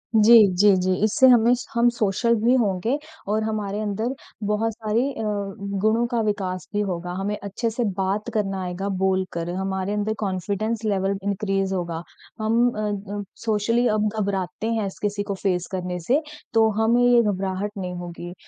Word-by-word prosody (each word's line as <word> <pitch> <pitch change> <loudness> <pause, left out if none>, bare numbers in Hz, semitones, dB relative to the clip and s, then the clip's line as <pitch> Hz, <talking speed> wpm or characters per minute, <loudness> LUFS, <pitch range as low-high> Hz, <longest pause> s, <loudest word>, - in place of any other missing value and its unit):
जी, 220 +2 +7 0.2
जी, 205 0 +6
जी। 185 0 +1
इससे 220 +5 +5
हमें 240 -1 +6
स 250 - -7
हम 235 +1 +4
सोशल 235 +1 +1
भी 245 - +5
होंगे 220 +4 +1 0.3
और 215 +2 0
हमारे 210 -2 -2
अंदर 215 +4 -2 0.4
बहुत 225 +2 +1
सारी 220 +1 0
अ, 225 - -6 0.6
गुणों 225 +2 +3
का 235 -1 +1
विकास 195 -4 -2
भी 205 - 0
होगा। 180 -3 -3
हमें 205 +2 -2
अच्छे 200 +4 -2
से 235 +2 -2
बात 195 +4 -1
करना 195 -3 -1
आएगा 180 +2 -4
बोलकर, 185 -3 0
हमारे 190 +1 -2
अंदर 210 +1 -1
कॉन्फ़िडेंस 205 +3 -2
लेवल 195 -1 0
इनक्रीज़ 195 -1 -1
होगा। 170 -3 -3 0.4
हम 220 +2 +1
अ, 215 - -6 0.3
अम 205 0 -3 0.2
सोशली 230 +2 +1
हम 215 0 +1
घबराते 195 +1 -2
हैं 220 -3 0
ऐसे 195 - -7
किसी 205 0 -3
को 200 -1 -3
फ़ेस 180 -3 0
करने 180 -1 -3
से, 260 - +1 0.3
तो 225 -1 +5
हमें 235 +2 +3
ये 245 -1 +6
घबराहट 195 -1 -1
नहीं 180 -2 -4
होगी। 175 0 -7
205 Hz, 170 wpm, -23 LUFS, 190-220 Hz, 0.6 s, जी